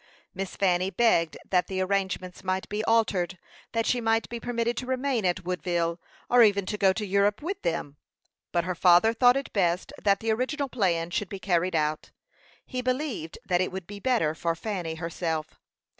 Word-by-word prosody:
Miss 195 Hz, -1 st, -5 dB
Fanny 185 Hz, -1 st, +2 dB
begged 185 Hz, -5 st, +2 dB
that 180 Hz, -1 st, +2 dB
the 190 Hz, -1 st, -3 dB
arrangements 185 Hz, -1 st, -2 dB
might 185 Hz, 0 st, -1 dB
be 210 Hz, +1 st, -2 dB
altered; 195 Hz, -5 st, +1 dB, 0.4 s
that 230 Hz, -1 st, +1 dB
she 245 Hz, -, +1 dB
might 225 Hz, 0 st, +1 dB
be 235 Hz, -, -5 dB
permitted 235 Hz, 0 st, -1 dB
to 250 Hz, -, -4 dB
remain 260 Hz, -4 st, 0 dB
at 180 Hz, 0 st, -1 dB
Woodville, 175 Hz, -2 st, -1 dB, 0.3 s
or 245 Hz, 0 st, +5 dB
even 200 Hz, -3 st, +4 dB
to 210 Hz, -, -3 dB
go 195 Hz, -1 st, +5 dB
to 210 Hz, +2 st, -3 dB
Europe 200 Hz, +4 st, +1 dB
with 375 Hz, +4 st, -3 dB
them; 150 Hz, -4 st, -2 dB, 0.5 s
but 170 Hz, -1 st, +1 dB
her 180 Hz, +1 st, -2 dB
father 180 Hz, +5 st, +5 dB
thought 245 Hz, +2 st, +5 dB
it 275 Hz, -, -5 dB
best 180 Hz, -2 st, 0 dB
that 200 Hz, -1 st, +3 dB
the 225 Hz, 0 st, 0 dB
original 265 Hz, +5 st, -1 dB
plan 175 Hz, -8 st, 0 dB
should 200 Hz, +1 st, -2 dB
be 200 Hz, -, -5 dB
carried 180 Hz, -2 st, 0 dB
out; 155 Hz, 0 st, -1 dB, 0.6 s
he 255 Hz, -1 st, -4 dB
believed 255 Hz, -, -2 dB
that 180 Hz, 0 st, +2 dB
it 185 Hz, -, -1 dB
would 190 Hz, -1 st, -6 dB
be 205 Hz, +2 st, -9 dB
better 225 Hz, -10 st, +1 dB
for 165 Hz, +1 st, -1 dB
Fanny 175 Hz, -4 st, -4 dB
herself. 165 Hz, -1 st, -4 dB
195 Hz, 190 wpm, -27 LUFS, 175-230 Hz, 0.6 s, or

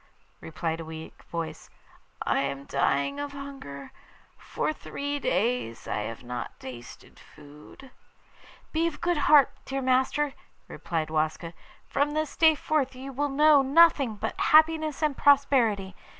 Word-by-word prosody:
replied 160 Hz, 0 st, -4 dB
a -, -, -5 dB
weak 160 Hz, 0 st, -10 dB
voice. 160 Hz, -2 st, -6 dB, 0.6 s
'I -, -, +1 dB
am 140 Hz, 0 st, -3 dB
dying 140 Hz, -, 0 dB
of 285 Hz, 0 st, -5 dB
hunger. 275 Hz, -, -9 dB, 0.4 s
For -, -, -3 dB
three 285 Hz, -1 st, -5 dB
days 215 Hz, -, -1 dB
I -, -, -2 dB
have 115 Hz, +3 st, -6 dB
not 125 Hz, 0 st, -6 dB
tasted 120 Hz, -2 st, -11 dB
food.' 150 Hz, -, -15 dB, 0.8 s
'Be 325 Hz, +1 st, +1 dB
of 310 Hz, -3 st, -5 dB
good 345 Hz, -1 st, 0 dB
heart, 290 Hz, -3 st, +7 dB
dear 270 Hz, 0 st, -4 dB
master,' 265 Hz, +3 st, +1 dB, 0.3 s
replied 160 Hz, -2 st, -4 dB
Waska; 155 Hz, +2 st, -1 dB, 0.3 s
'from 290 Hz, +1 st, 0 dB
this 310 Hz, 0 st, -2 dB
day 320 Hz, -1 st, +5 dB
forth 290 Hz, -3 st, -1 dB
you 270 Hz, +1 st, -8 dB
will 290 Hz, +3 st, -1 dB
know 295 Hz, +1 st, +5 dB
nothing 275 Hz, -4 st, +4 dB
but 220 Hz, +2 st, -4 dB
happiness 315 Hz, -1 st, +3 dB
and 300 Hz, -2 st, +1 dB
prosperity. 245 Hz, -10 st, +3 dB
265 Hz, 135 wpm, -27 LUFS, -, 0.8 s, heart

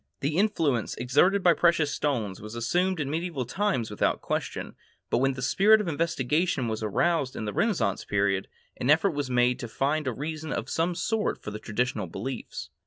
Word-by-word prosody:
The 145 Hz, +3 st, -1 dB
influence 165 Hz, -, +1 dB
exerted 185 Hz, +10 st, +3 dB
by 175 Hz, -, +6 dB
precious 165 Hz, -4 st, +3 dB
stones 115 Hz, -10 st, -2 dB
was 105 Hz, +2 st, -8 dB
assumed 175 Hz, +10 st, 0 dB
in 145 Hz, -, -1 dB
medieval 160 Hz, -5 st, -2 dB
times 130 Hz, -, -1 dB
without 105 Hz, -, 0 dB
question, -, -, -3 dB, 0.4 s
but -, -, +3 dB
when 135 Hz, +1 st, +2 dB
the 125 Hz, -1 st, -6 dB
spirit 210 Hz, +10 st, +5 dB
of 210 Hz, -, -2 dB
investigation 160 Hz, -2 st, 0 dB
was 110 Hz, -1 st, -3 dB
aroused 135 Hz, -, +1 dB
in 110 Hz, -, -4 dB
the 105 Hz, -, -3 dB
Renaissance 175 Hz, -, 0 dB
period, 100 Hz, -1 st, 0 dB, 0.3 s
an 125 Hz, -, -2 dB
effort 160 Hz, +6 st, +5 dB
was 145 Hz, -3 st, -3 dB
made 125 Hz, 0 st, +2 dB
to 120 Hz, -, -5 dB
find 140 Hz, +6 st, -1 dB
a -, -, +1 dB
reason 155 Hz, +4 st, -5 dB
of -, -, -3 dB
some 170 Hz, +2 st, 0 dB
sort 215 Hz, +4 st, -1 dB
for 105 Hz, -, -5 dB
the 105 Hz, -, -6 dB
traditional 110 Hz, -2 st, -2 dB
beliefs. 95 Hz, -, -6 dB
140 Hz, 185 wpm, -27 LUFS, 115-170 Hz, 0.4 s, by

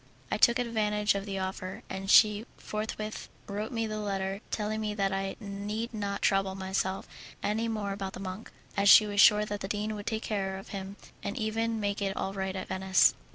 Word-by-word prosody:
I -, -, +1 dB
took 235 Hz, -1 st, +5 dB
advantage 215 Hz, -3 st, +1 dB
of 200 Hz, +1 st, -4 dB
the 195 Hz, -1 st, -3 dB
offer, 190 Hz, 0 st, -4 dB
and 190 Hz, 0 st, -5 dB
she 210 Hz, +1 st, +6 dB
forthwith 215 Hz, 0 st, -4 dB, 0.2 s
wrote 210 Hz, +4 st, -4 dB
me 225 Hz, -2 st, -1 dB
the 215 Hz, -1 st, -3 dB
letter, 195 Hz, -1 st, -2 dB
telling 215 Hz, 0 st, -2 dB
me 210 Hz, -1 st, -2 dB
that 195 Hz, -2 st, +1 dB
I 195 Hz, 0 st, -2 dB
need 210 Hz, +3 st, -4 dB
not 200 Hz, -2 st, -3 dB
trouble 195 Hz, -1 st, +2 dB
myself 190 Hz, 0 st, -2 dB, 0.4 s
any 220 Hz, +2 st, 0 dB
more 215 Hz, -3 st, -2 dB
about 195 Hz, -1 st, -4 dB
the -, -, -7 dB
monk, 190 Hz, +3 st, -6 dB, 0.3 s
as 200 Hz, 0 st, +4 dB
she 215 Hz, -, +10 dB
was 205 Hz, -1 st, +3 dB
sure 210 Hz, -1 st, +7 dB
that 205 Hz, -1 st, -4 dB
the 195 Hz, -, -4 dB
dean 210 Hz, +1 st, -2 dB
would 205 Hz, -1 st, -7 dB
take 220 Hz, -1 st, -1 dB
care 195 Hz, -3 st, -2 dB
of 195 Hz, -, -10 dB
him, 195 Hz, 0 st, -6 dB, 0.3 s
and 200 Hz, -, -4 dB
even 225 Hz, +1 st, -1 dB
make 205 Hz, -1 st, -1 dB
it 195 Hz, -1 st, -1 dB
all 195 Hz, -, -2 dB
right 190 Hz, -1 st, -3 dB
at 190 Hz, -, -4 dB
Venice. 190 Hz, 0 st, +4 dB
205 Hz, 205 wpm, -30 LUFS, 195-215 Hz, 0.4 s, she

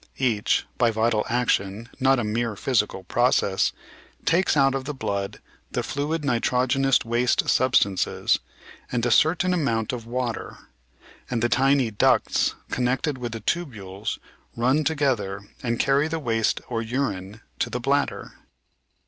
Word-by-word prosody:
Each 115 Hz, -6 st, +1 dB
— -, -, -38 dB
by 120 Hz, -, +4 dB
vital 110 Hz, 0 st, +1 dB
action, 115 Hz, -3 st, 0 dB
not 135 Hz, 0 st, +4 dB
a 120 Hz, -, 0 dB
mere 110 Hz, +1 st, -1 dB
physical 105 Hz, -5 st, 0 dB
process 110 Hz, -2 st, +2 dB, 0.3 s
— -, -, -28 dB
^takes 170 Hz, -1 st, +2 dB
out 135 Hz, -1 st, +4 dB
of 135 Hz, -1 st, -3 dB
the 150 Hz, 0 st, -4 dB
blood 100 Hz, -5 st, -3 dB, 0.3 s
the -, -, -1 dB
fluid 150 Hz, +2 st, -2 dB
nitrogenous 130 Hz, +1 st, +2 dB
waste 120 Hz, +1 st, +1 dB
substances 120 Hz, -7 st, +2 dB, 0.5 s
and 120 Hz, -1 st, 0 dB
a 120 Hz, -, +1 dB
certain 170 Hz, +8 st, +3 dB
amount 115 Hz, -9 st, 0 dB
of 115 Hz, -2 st, -6 dB
water, 120 Hz, -1 st, -3 dB, 0.7 s
and 120 Hz, -2 st, -1 dB
the 120 Hz, -, +2 dB
tiny 135 Hz, -1 st, +3 dB
ducts 105 Hz, -, +2 dB, 0.2 s
connected 130 Hz, +3 st, 0 dB
with 120 Hz, -2 st, -4 dB
the 115 Hz, -, -6 dB
tubules 105 Hz, -, -3 dB, 0.4 s
run 130 Hz, +6 st, +2 dB
together 130 Hz, -10 st, 0 dB, 0.2 s
and 120 Hz, -1 st, -1 dB
carry 140 Hz, +2 st, +3 dB
the 165 Hz, +1 st, -2 dB
waste 115 Hz, -7 st, 0 dB
or 115 Hz, -2 st, -2 dB
urine 110 Hz, -4 st, -3 dB, 0.2 s
to -, -, 0 dB
the 125 Hz, -, -3 dB
bladder. 140 Hz, +3 st, -1 dB
120 Hz, 145 wpm, -24 LUFS, 110-135 Hz, 0.7 s, by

